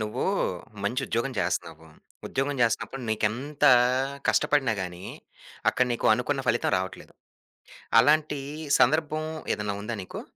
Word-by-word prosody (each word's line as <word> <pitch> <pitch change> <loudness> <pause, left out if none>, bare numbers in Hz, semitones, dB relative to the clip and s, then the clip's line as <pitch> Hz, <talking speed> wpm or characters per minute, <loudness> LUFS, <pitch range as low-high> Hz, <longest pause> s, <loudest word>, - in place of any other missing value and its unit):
నువ్వూ 105 0 -2 0.6
మంచి 120 +7 -1
ఉద్యోగం 120 +4 -1
జేస్తన్నావు. 80 -3 -2 0.4
ఉద్యోగం 135 +2 -1
జేస్తున్నప్పుడు 120 +3 0
నీకెంతా 130 +7 +1 0.6
కష్టపడినా 135 -6 +2
గానీ, 90 -1 -7 0.7
అక్కడ 125 - +1
నీకు 120 - -1
అనుకున్న - - -1
ఫలితం - - +1
రావట్లేదు. 95 0 -6 0.9
అలాంటి 150 +3 +3 0.4
సందర్భం 155 +3 +2 0.3
ఏదన్నా 105 -1 -3
ఉందా 115 +2 -4
నీకు? - - -8
120 Hz, 110 wpm, -26 LUFS, 105-145 Hz, 0.9 s, అలాంటి